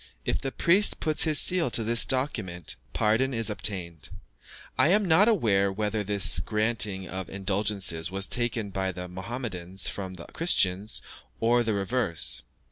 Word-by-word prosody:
If - - -1
the 135 - -3
priest 190 +9 +3
puts 155 -1 +3
his 155 -2 +3
seal 180 -6 +2
to 115 - +3
this 115 +1 +3
document, 110 - -2 0.2
pardon 115 - +1
is 115 -1 0
obtained. 90 -7 -2 0.7
I - - +4
am 200 +4 +3
not 175 +6 +5
aware 105 - +2
whether 105 +1 -2
this 100 -4 +2
granting 105 -1 0
of 95 -1 -6
indulgences 95 -4 -1
was 95 +1 -1
taken 115 -2 -2
by 95 0 -2
the 90 0 -7
Mahomedans 95 -2 -4
from 95 -2 -6
the 85 - -10
Christians, 100 - +1 0.4
or 120 +1 +3
the 110 -3 -1
reverse. 100 -3 -1
105 Hz, 150 wpm, -27 LUFS, 95-120 Hz, 0.7 s, not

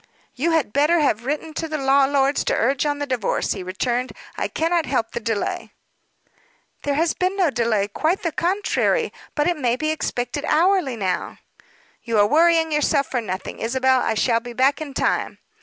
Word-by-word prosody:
"You 300 +7 -1
had 295 -10 0
better 300 +5 +3
have 240 -5 +1
written 305 +2 -3
to 325 +1 -3
the 310 -1 -3
law 275 0 +4
lords 275 0 +1
to - - +1
urge 270 +4 +1
on 290 0 -1
the 290 - -3
divorce," 255 -6 -1
he 195 - -3
returned. 240 +7 -2 0.2
"I - - -2
cannot 330 0 0
help 250 -4 -1
the - - -3
delay." 225 -2 -3 1.1
"There 285 -1 -1
has 325 +2 +1
been 370 +2 -1
no 355 -6 +2
delay; 230 -5 0
quite 315 - -1
the 335 - 0
contrary. 415 +7 0 0.2
But 295 +1 +1
it 350 -2 +1
may 245 -4 +1
be 310 +4 -1
expected 265 -2 -3
hourly 345 -5 +2
now." 190 -4 -3 0.6
"You 230 -2 -1
are 205 - +6
worrying 325 +5 +3
yourself 290 -2 +1
for 250 - 0
nothing, 185 -4 -6
Isabel. 260 +3 +2
I 225 - 0
shall 230 +2 +2
be 240 +1 -9
back 265 +5 +2
in 285 -3 -7
time." - - 0
275 Hz, 190 wpm, -22 LUFS, 240-315 Hz, 1.1 s, are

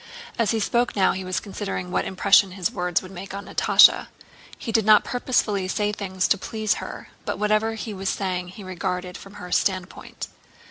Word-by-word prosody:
As 230 -3 +2
he 225 - +1
spoke 240 +3 0
now 195 -2 +4
he 190 - -4
was 185 0 -2
considering 195 -3 -5
what - - 0
impression 195 0 +4
his 185 -3 -2
words 180 0 -1
would 185 - -10
make 195 +1 -8
on 200 0 -6
Natásha. - - +5 0.5
He 230 - -5
did 225 0 +3
not 215 0 +6
purposely 215 -6 0
say 210 +2 0
things 190 -3 -2
to 200 - +3
please 215 +1 -1
her, - - -8
but - - -3
whatever 215 +1 +1
he 220 0 -5
was 190 0 -3
saying 185 -2 -2
he 185 +3 -11
regarded 180 -1 -4
from 195 +1 -11
her 180 -3 -9
standpoint. 185 -1 -2
195 Hz, 190 wpm, -24 LUFS, 185-210 Hz, 0.5 s, not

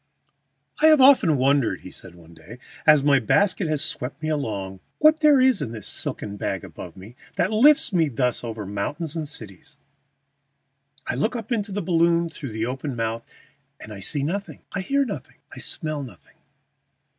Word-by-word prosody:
] - - -21
"I - - +9
have 310 -2 +6
often 255 - +6
wondered," 135 -1 +1
he 95 - -10
said 90 -2 -10
one 85 -1 -16
day, 85 +8 -13 0.3
"as 150 -2 +6
my 140 -1 +4
basket 185 - +1
has 155 -1 0
swept 135 +3 -4
me 155 - -1
along, 100 -10 -3 0.2
what 310 +1 +5
there 300 -3 +5
is 255 -4 +4
in 115 - -4
this 110 -3 -8
silken 100 0 -3
bag 95 -2 -3
above - - -10
me 100 +6 -12 0.2
that 180 +4 0
lifts 260 +2 +4
me 165 -4 +2
thus 125 -1 -1
over 110 -3 -5
mountains 145 - -4
and 160 -2 -3
cities. 100 - -9 1.3
I - - -2
look 215 - -1
up 225 0 -6
into 210 -3 -1
the 200 0 -3
balloon 170 0 +2
through 140 -6 -7
the 110 +1 -2
open 135 +2 -4
mouth, 115 0 -3 0.6
and 110 - -10
I 100 - -9
see 140 +8 -2
nothing; 195 +7 -4
I 200 - -2
hear 275 +8 +1
nothing; - - -7 0.2
I - - -9
smell 155 -2 -3
nothing. 120 -10 -13
145 Hz, 185 wpm, -23 LUFS, -, 1.3 s, I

